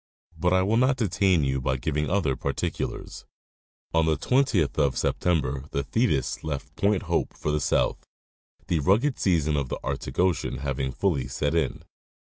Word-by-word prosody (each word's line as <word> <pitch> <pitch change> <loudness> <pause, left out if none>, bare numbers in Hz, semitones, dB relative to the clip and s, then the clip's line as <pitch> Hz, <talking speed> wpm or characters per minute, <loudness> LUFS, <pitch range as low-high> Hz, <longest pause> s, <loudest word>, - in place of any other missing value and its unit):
But 90 - +1
I 95 0 +4
will 105 +4 +2
not 130 +2 +3
detain 95 - +2
you 65 -1 0
by 65 0 0
giving 75 +4 -1
other 85 -9 +1
particulars. - - -4 0.7
On 80 0 +3
the 80 -2 +2
20th 115 - +2
of 70 -3 +2
September 70 -6 0
the 70 - -2
Thetis 65 - 0
left 75 -3 -5
Point 100 -1 +1
Hope - - -1
for 75 - -2
the 75 0 0
south, - - +1 0.6
the 85 - 0
rugged 110 - +2
season 80 -5 +2
of 70 -3 -1
the - - -3
Arctic 70 0 -4
ocean 90 -7 +1
having 70 -1 -2
fully 70 -7 0
set 70 +4 -1
in. 85 -1 -1
80 Hz, 165 wpm, -26 LUFS, 70-95 Hz, 0.7 s, I